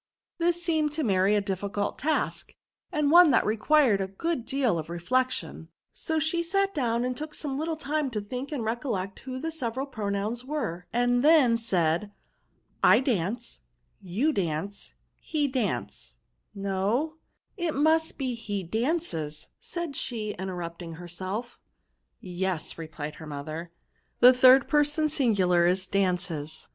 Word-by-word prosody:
This 345 0 +1
seemed 315 -3 +1
to 310 0 -1
Mary 195 -2 +3
a 205 - +2
difficult 200 0 -3
task, 310 +3 -1 0.4
and 300 -3 +1
one 345 0 +8
that 240 - +3
required 225 0 +3
a 190 - -1
good 250 - -3
deal 255 -10 +1
of 155 - -7
reflection; 175 -2 -1 0.3
so 320 - -2
she 315 +2 +1
sat 390 +3 0
down, 240 -5 0
and 250 0 -2
took 300 +3 -7
some 285 -3 -3
little 320 +3 -2
time 300 -1 -1
to 225 -4 -3
think 250 +7 -6
and 260 -7 -3
recollect 220 -5 -3
who 255 -1 -6
the 320 +5 -3
several 260 -4 -2
pronouns 215 -1 -3
were, 255 - -4
and 245 +1 +2
then 295 -6 +6
said, 190 -4 0 0.2
— - - -44
" - - -33
I - - +6
dance, 235 - -2 0.4
you 220 - 0
dance, 180 - -3 0.2
he 295 -3 -1
dance 225 - -3
t - - -16
no, 205 +11 0 0.4
it 345 -5 -2
must 320 +3 +2
be 260 -3 -2
he 205 -4 -4
dances," 185 - -2
said 345 -5 -5
she, 220 -5 -1
interrupting 175 -3 -6
herself. 185 +7 -5 0.4
'* - - -50
Yes," 180 -2 -3
replied 155 -2 -6
her 160 - -9
mother, 155 +3 -6 0.5
the 250 +1 +9
third 255 +1 +7
person 295 0 +2
singular 190 - +3
is 185 +1 +2
dances. 180 -5 -1
230 Hz, 150 wpm, -27 LUFS, 185-295 Hz, 0.5 s, the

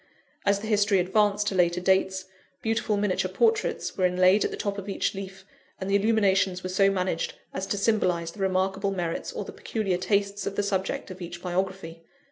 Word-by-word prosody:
As 200 0 +4
the - - -6
history 205 -2 +3
advanced 205 +3 +2
to - - -4
later 175 -1 +2
dates, 190 0 +1 0.4
beautiful 225 -1 0
miniature 200 -2 0
portraits 450 -2 +1
were 185 - +2
inlaid 185 +3 +4
at - - 0
the - - -6
top 200 -1 -2
of 200 +1 -7
each 195 - -1
leaf; 195 -1 -8 0.3
and 190 - -4
the - - +4
illuminations 200 -3 +2
were 185 - -3
so 195 +1 +4
managed 185 -3 -1 0.2
as 190 0 -3
to 205 - -1
symbolize 180 -6 +1
the 205 - -15
remarkable 190 +1 0
merits 175 -4 -3
or - - -5
the - - -9
peculiar 195 -5 -2
tastes 200 +2 0
of 200 - -3
the 205 - 0
subject 195 -1 -2
of 185 0 -10
each 175 0 -7
biography. 180 -2 -3
195 Hz, 195 wpm, -26 LUFS, 185-205 Hz, 0.4 s, As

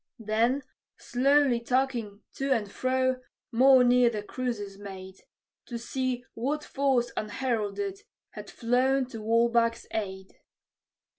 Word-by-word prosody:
Then, 230 +6 +1 0.3
slowly 275 0 +3
tacking 235 -4 -1
to 275 0 -1
and 215 -6 +1
fro, 255 +1 0 0.3
more 260 +2 +6
near 245 0 +5
the 210 -3 -4
cruisers 205 -5 -4
made, 190 -2 -9 0.5
To 240 - -4
see 250 +1 -3
what 285 +6 -2
force 265 -3 +1
unheralded 240 - -2 0.3
had - - -9
flown 255 +3 +1
to 225 - -7
Walbach's 230 +1 +2
aid. 190 -3 -5
240 Hz, 115 wpm, -28 LUFS, 220-260 Hz, 0.5 s, more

